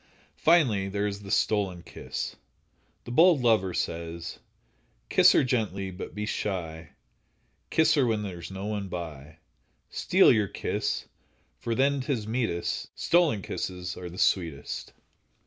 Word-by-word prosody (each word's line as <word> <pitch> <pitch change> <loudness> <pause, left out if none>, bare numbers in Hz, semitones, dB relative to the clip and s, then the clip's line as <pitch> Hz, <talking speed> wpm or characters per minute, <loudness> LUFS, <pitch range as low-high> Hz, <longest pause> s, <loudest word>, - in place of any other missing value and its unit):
Finally, 125 - +3
there 100 +1 -1
is 100 0 -3
the 100 - -10
stolen 95 -4 +1
kiss. - - -6 0.7
The - - -8
bold 160 +1 +5
lover 110 -6 +3
says: 85 0 -4 0.7
Kiss - - +7
her - - +4
gently, 105 -7 -1
but 90 - -8
be 105 0 -3
sly, 80 -7 -4 0.8
Kiss 160 -1 +4
her 140 -5 +3
when 110 -2 0
there's 90 -4 -6
no 95 +1 -6
one 105 -2 -3
by, 80 -4 -7 0.5
Steal - - +5
your 105 -4 +2
kiss, - - -2 0.5
for 115 - -2
then 140 +2 +2
'tis 130 -5 -2
meetest, 110 -6 -2
Stolen 165 - +2
kisses 90 -1 -4
are 90 -1 -7
the 90 - -11
sweetest. 80 -8 -1
100 Hz, 135 wpm, -27 LUFS, 90-120 Hz, 0.8 s, Kiss